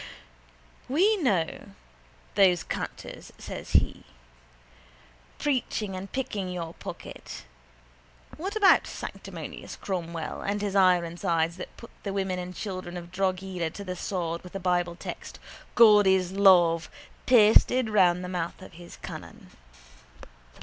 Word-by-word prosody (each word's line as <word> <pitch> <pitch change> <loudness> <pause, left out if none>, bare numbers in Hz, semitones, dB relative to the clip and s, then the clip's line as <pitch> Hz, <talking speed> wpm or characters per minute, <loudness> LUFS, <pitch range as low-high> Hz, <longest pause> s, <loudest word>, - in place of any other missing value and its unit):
—We 375 +11 +4
know 200 - -1 0.6
those 180 -4 +4
canters, - - -6
says - - -8
he, - - +2 1.3
preaching 240 -8 -1
and 190 +1 -7
picking 215 -8 -3
your 170 -2 -5
pocket. - - -9 0.9
What 390 +6 -5
about 410 -3 +5
sanctimonious - - -8
Cromwell 170 -4 -4
and 205 +1 -1
his 205 -1 -2
ironsides 170 -2 +2
that - - -9
put 230 - -12
the 200 - -4
women 190 -2 -1
and 180 0 -6
children 185 -3 -5
of 175 0 -9
Drogheda 185 -2 -1
to 200 +5 -8
the 185 -2 -5
sword 170 -2 -3
with 180 - -12
the 195 - -4
bible 175 -1 0
text - - -8 0.4
God 210 -4 +7
is 190 -1 +3
love 175 -4 +5 0.4
pasted 245 +1 +6
round 185 -4 +3
the - - -4
mouth 175 -2 -3
of - - -12
his 175 +1 -12
cannon? - - -9
185 Hz, 125 wpm, -27 LUFS, 175-205 Hz, 1.3 s, God